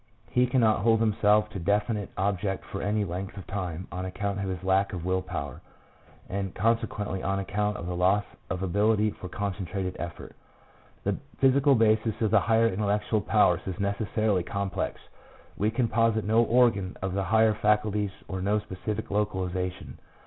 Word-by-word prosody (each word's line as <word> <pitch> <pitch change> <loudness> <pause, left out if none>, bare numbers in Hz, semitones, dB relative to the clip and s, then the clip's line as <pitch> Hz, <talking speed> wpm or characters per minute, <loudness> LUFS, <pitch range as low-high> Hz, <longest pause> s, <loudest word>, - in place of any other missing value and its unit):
He 125 0 +3
cannot 115 -4 +3
hold 115 +2 +3
himself 105 -1 +3
to - - -5
a - - -5
definite 105 +2 0
object 95 0 -1
for 100 - -6
any 105 0 0
length 95 +3 -5
of 95 - -7
time 90 -2 -4
on 90 +1 -4
account 100 +2 -3
of 100 -1 -2
his 95 -1 -4
lack 95 +1 +2
of 90 -2 -5
will 95 0 +1
power, - - -6 0.7
and, 95 -1 -4
consequently, 105 -3 0
on 95 0 -1
account 105 +2 -1
of - - -6
the 90 0 -3
loss 95 +4 +3 0.3
of 95 0 -3
ability 105 +3 +2
for 90 - -9
concentrated 95 -1 -3
effort. 85 0 -7 0.7
The - - 0 0.2
physical 135 +1 +4
basis 110 -1 +2
of 110 -3 +1
the - - +6
higher 115 0 +3
intellectual 105 +1 0
powers - - +3
is 95 -2 -4
necessarily 100 0 0
complex. 100 +2 -3 0.6
We 105 - +1
can 115 +1 0
posit 115 -1 +2
no 110 +2 +4
organ 115 -6 +2
of 95 -1 -2
the 100 0 -1
higher 110 +3 +4
faculties 105 -1 +1 0.2
or 95 -1 -4
no 100 +3 +2
specific 105 +1 -5
localization. 95 -3 -2
100 Hz, 170 wpm, -27 LUFS, 95-110 Hz, 0.7 s, the